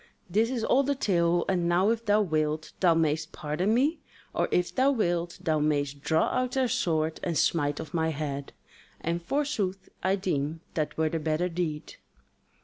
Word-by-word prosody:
This 215 +6 +2
is 250 -3 -2
all 260 - +4
the 280 +1 0
tale, 175 -7 +2
and 175 -3 +1
now 185 +5 +3
if 230 0 -3
thou 205 +1 +4
wilt, 155 -3 -1
thou 175 -3 +4
mayst 155 0 0
pardon 155 +7 -1
me; 275 +8 +2 0.3
or - - 0
if 180 0 +1
thou 265 +1 +3
wilt, 175 -9 0
thou 155 -1 +1
mayst 145 -2 0
draw 160 +1 +2
out 255 0 -1
thy 265 -1 +2
sword 165 -10 0
and 170 -3 -1
smite 145 -3 +1
off 155 - -7
my 160 -1 +1
head. 140 -2 -4 0.5
And 170 +1 -2
forsooth 200 - -2
I 190 +1 +2
deem 160 -5 -2
that 155 -2 -2
were 160 0 +2
the 165 - -2
better 160 +3 0
deed." 165 -3 -4
170 Hz, 180 wpm, -28 LUFS, 155-205 Hz, 0.5 s, all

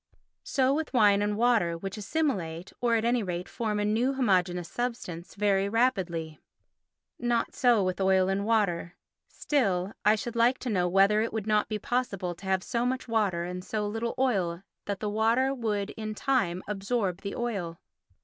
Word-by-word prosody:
So 265 -1 +2
with 300 -2 -2
wine 205 -3 +5
and 205 0 0
water 220 -8 +2
which 195 +3 -5
assimilate, 195 - -2
or 235 -1 +3
at 225 0 +1
any 240 0 +2
rate 180 -2 -4
form 215 -3 -2
a 205 - 0
new 230 +6 +1
homogeneous 180 -8 +1
substance, 210 -7 -5
very 200 -1 +2
rapidly. 185 -9 0 0.8
Not 240 -1 0
so 240 -5 +3
with 185 +1 -1
oil 190 -1 +3
and 195 +1 0
water. 200 -6 0 0.3
Still, 200 -9 0
I 210 +1 +5
should 235 +2 -5
like 240 +2 +3
to 250 - -2
know 180 -3 +1
whether 195 +3 +4
it 225 - -1
would 220 -2 -3
not 215 -1 +1
be 215 - -1
possible 205 -6 -2
to 185 +3 -14
have 190 -1 +1
so 235 0 -1
much 255 +1 -2
water 205 -7 +1
and 180 +1 -5
so 210 +2 -2
little 225 +3 -3
oil 190 -9 0 0.2
that 200 -1 -4
the 215 - -1
water 230 +5 +2
would 215 -5 -2
in 215 -1 -5
time 200 -9 0
absorb 195 -2 -2
the 200 - -5
oil. 195 -9 -3
210 Hz, 180 wpm, -28 LUFS, 185-235 Hz, 0.8 s, wine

